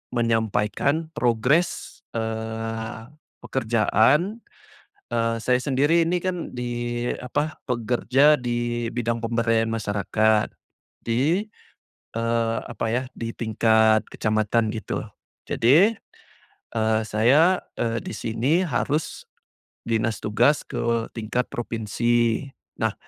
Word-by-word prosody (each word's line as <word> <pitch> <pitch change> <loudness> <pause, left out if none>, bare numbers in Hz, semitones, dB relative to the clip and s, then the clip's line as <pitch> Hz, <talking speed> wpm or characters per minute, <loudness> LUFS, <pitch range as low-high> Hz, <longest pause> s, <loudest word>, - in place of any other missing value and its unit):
menyampaikan 115 +7 0
progres, 125 +8 +1 0.2
eee, 110 +1 -4 0.3
pekerjaan, 130 - +2 0.7
eee, 115 -1 0
saya 125 -1 +3
sendiri 150 +5 +2
ini 180 +1 +1
kan 180 -6 -3
di, 120 0 -3
apa, 150 +5 -2
pekerja 125 +4 +3
di 120 -1 -2
bidang 115 -1 -1
pemberdayaan 115 -1 +1
masyarakat, 110 0 +1 0.5
di 145 - +1 0.7
eee, 115 0 0
apa 115 -1 -3
ya, 125 +3 0
di 115 0 -4
tingkat 110 -1 +3
kecamatan 110 +1 +1
gitu 110 - -4 0.4
jadi, 165 - +4 0.8
eee, 110 -1 +1
saya, 140 - +4 0.2
eee, 115 -1 -1
di - - -7
sini 120 - 0
harus 150 0 -2 0.6
dinas 115 -1 0
tugas 120 +8 +2
ke 115 -1 -1
tingkat 115 +2 -2
provinsi. 115 +2 0 0.3
Nah, - - +1
115 Hz, 95 wpm, -24 LUFS, 110-130 Hz, 0.8 s, jadi